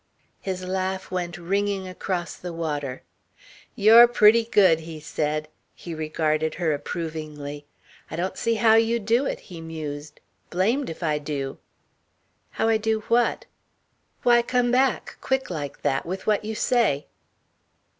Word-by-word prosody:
His 185 -1 -4
laugh 190 0 -3
went 175 -1 -3
ringing 195 +2 -1
across 180 -1 -3
the 180 - -7
water. 145 -6 -4 0.7
"You're 225 +3 +8
pretty 230 -1 +5
good," 190 -8 +4
he 160 -1 -8
said. 155 0 -2 0.3
He 170 - -8
regarded 155 0 -1
her 165 -3 0
approvingly. 150 -2 -5 0.4
"I - - -5
don't 180 +3 -2
see 230 0 0
how 220 0 +5
you 225 +1 +4
do 235 +5 +1
it," - - -3
he 170 -3 -10
mused, 155 -2 -7 0.3
"blamed 225 +10 +1
if 165 +2 -7
I 150 -2 +1
do." 140 -2 -4 1.0
"How - - +2
I 225 -1 +4
do 220 0 0
what?" 235 +1 +2 0.8
"Why 240 -1 +5
come 245 0 +1
back, 260 +1 +1
quick 265 -6 -1
like 145 -4 -5
that, 135 - +1
with 190 +3 -5
what 210 -1 +2
you 220 +1 -4
say." 220 - +1
180 Hz, 145 wpm, -24 LUFS, 155-220 Hz, 1.0 s, You're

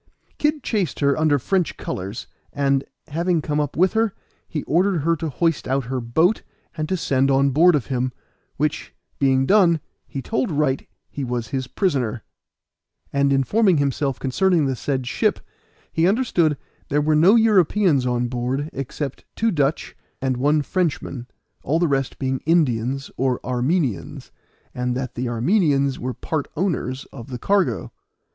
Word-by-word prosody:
Kid 300 -2 +1
chased 200 - -1
her 140 -1 +3
under 155 -2 +3
French 180 +6 0
colors, 95 +4 -5 0.3
and, 140 -1 +1 0.2
having 170 +3 +1
come 150 -1 -1
up 145 -1 -2
with 185 +2 +3
her, 220 -2 +1 0.3
he 150 - -4
ordered 180 +1 +2
her 165 +3 +2
to 160 0 -4
hoist 165 +2 0
out 135 +1 0
her 130 +1 -3
boat 160 - +2 0.3
and 155 -1 -3
to 185 - 0
send 135 -4 +1
on 135 0 +3
board 165 +5 +5
of 140 - -1
him, 130 -1 -1 0.5
which, 150 +1 -2 0.2
being 135 -1 +3
done, 175 -3 +4 0.3
he 140 - -5
told 225 - -1
Wright 145 -4 0 0.2
he 140 - -6
was 120 -2 -3
his 130 -2 -3
prisoner; 130 - -1 0.9
and 140 0 +2
informing 175 - +3
himself 140 -1 0
concerning 165 +4 +2
the 135 -1 0
said 130 0 -2
ship, - - 0 0.5
he 165 +1 +3
understood 185 - +2 0.3
there 145 - +2
were 155 +1 +2
no 175 +8 +6
Europeans 200 - +4
on 125 0 0
board 125 +5 -2
except 135 +1 -5
two 225 0 +1
Dutch, 145 -3 -1 0.2
and 130 -1 0
one 145 +4 +2
Frenchman, 145 -7 -2 0.3
all 150 +5 0
the 170 0 +2
rest 135 -2 -1
being 130 -1 -1
Indians 135 -5 +1
or 130 -1 +1
Armenians, 130 - -1 0.4
and 125 0 -2
that 130 -2 -4
the 125 0 -3
Armenians 140 - +2
were 125 +1 -4
part 155 -3 -3
owners 145 -8 -1
of 120 -4 -9
the 125 - -4
cargo. 130 - 0
140 Hz, 160 wpm, -22 LUFS, 130-170 Hz, 0.9 s, no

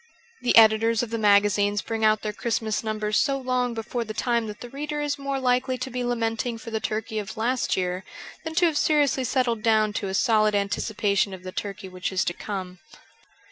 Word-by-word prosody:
The 250 - +2
editors 225 +1 +5
of 230 - -6
the 230 - -2
magazines 205 0 +3
bring 225 -1 -3
out 215 0 +3
their 210 -1 -2
Christmas 220 0 -1
numbers 215 -1 0
so 275 -2 +1
long 250 -2 -1
before 235 +2 -3
the 215 -1 -7
time 235 -1 0
that 210 0 -8
the 245 - -8
reader 295 +2 -4
is 290 -1 -2
more 275 -1 -2
likely 255 0 +1
to 255 +1 -5
be 250 0 -2
lamenting 230 0 -1
for 230 +1 -9
the 220 - -1
turkey 215 0 -3
of 205 0 -7
last 240 +1 0
year 180 0 -2 0.4
than 320 -1 -5
to 350 +1 +4
have 315 -3 +2
seriously 290 -4 +2
settled 245 -3 0
down 215 -1 +3
to 205 -1 -2
a 190 - -3
solid 215 -2 +3
anticipation 200 0 0
of 185 - -14
the 185 - -6
turkey 200 0 -5
which 185 0 -4
is 190 0 0
to 175 - -1
come. 185 -2 -6
225 Hz, 210 wpm, -25 LUFS, 210-250 Hz, 0.4 s, editors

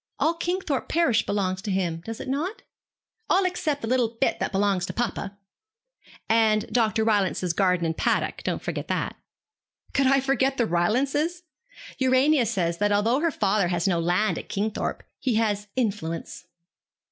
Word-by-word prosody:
All 325 - +2
Kingthorpe 340 -4 -2
parish 275 -10 +2
belongs 190 -2 -1
to 210 - -5
him, 175 -4 -1
does 225 +2 -6
it - - -6
not?' 305 +10 -3 0.7
'All 375 +1 +3
except 315 -6 -1
the - - -2
little 235 -2 +1
bit 270 - +1
that - - -1
belongs 195 -2 +1
to - - -5
papa.' 200 -4 -3 0.9
'And 220 -1 +3
Dr. 225 -2 +2
Rylance's 195 -5 +1
garden 180 -2 +2
and 160 0 -1
paddock; - - 0
don't - - -3
forget - - -4
that.' - - -2 0.8
'Could 275 -1 +3
I 275 +1 +5
forget 270 0 +1
the 235 - +2
Rylances? 275 - 0 0.6
Urania 260 0 +3
says 170 -6 -1
that 205 0 +2
although 220 +6 +2
her 335 +2 +2
father 200 - +1
has 175 +1 0
no 175 -3 +2
land 180 +6 +1
at - - -11
Kingthorpe, 210 +1 -2 0.2
he 255 -5 0
has 210 -2 0
influence.' 200 -9 -3
220 Hz, 160 wpm, -25 LUFS, 195-270 Hz, 0.9 s, I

